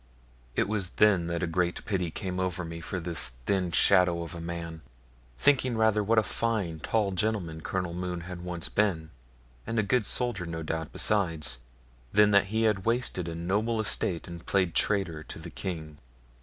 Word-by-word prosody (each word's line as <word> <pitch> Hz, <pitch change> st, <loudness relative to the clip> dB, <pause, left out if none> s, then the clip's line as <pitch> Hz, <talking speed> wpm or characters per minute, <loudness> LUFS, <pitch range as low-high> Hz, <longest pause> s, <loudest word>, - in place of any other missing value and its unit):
It -, -, +1 dB
was 100 Hz, -4 st, -1 dB
then 100 Hz, -5 st, +4 dB
that 85 Hz, 0 st, -2 dB
a -, -, +3 dB
great 85 Hz, +1 st, -1 dB
pity 90 Hz, -5 st, -1 dB
came 90 Hz, +3 st, -4 dB
over 90 Hz, -1 st, -2 dB
me 85 Hz, 0 st, -7 dB
for 90 Hz, +2 st, -4 dB
this 85 Hz, -7 st, +1 dB
thin 95 Hz, -3 st, 0 dB
shadow 85 Hz, 0 st, +4 dB
of 85 Hz, 0 st, -7 dB
man; 85 Hz, -1 st, -6 dB, 0.6 s
thinking 130 Hz, -, +3 dB
rather 110 Hz, -1 st, +3 dB
what 110 Hz, +3 st, +1 dB
a 110 Hz, -, +5 dB
fine, 105 Hz, -9 st, -1 dB
tall 105 Hz, +4 st, 0 dB
gentleman 90 Hz, -4 st, -1 dB
Colonel 90 Hz, 0 st, -3 dB
Mohune 90 Hz, 0 st, -4 dB
had 90 Hz, 0 st, -7 dB
once 90 Hz, -1 st, -2 dB
been, 90 Hz, -7 st, 0 dB, 0.6 s
and 115 Hz, -, -2 dB
a 110 Hz, -, +3 dB
good 110 Hz, +2 st, +1 dB
soldier 120 Hz, -8 st, 0 dB
no 80 Hz, -1 st, -5 dB
doubt 80 Hz, 0 st, -3 dB
besides, 85 Hz, -, +2 dB, 0.5 s
than 105 Hz, 0 st, +5 dB
that 100 Hz, 0 st, +5 dB
he 110 Hz, +3 st, -1 dB
had 105 Hz, -4 st, +2 dB
wasted 115 Hz, -6 st, 0 dB
a 85 Hz, -, -4 dB
noble 105 Hz, +7 st, 0 dB
estate 95 Hz, -5 st, +2 dB
and 85 Hz, -1 st, -9 dB
played 95 Hz, -4 st, +1 dB
traitor 95 Hz, -7 st, +1 dB
to -, -, -8 dB
the -, -, -8 dB
king. 80 Hz, -5 st, -5 dB
90 Hz, 180 wpm, -28 LUFS, 85-105 Hz, 0.6 s, a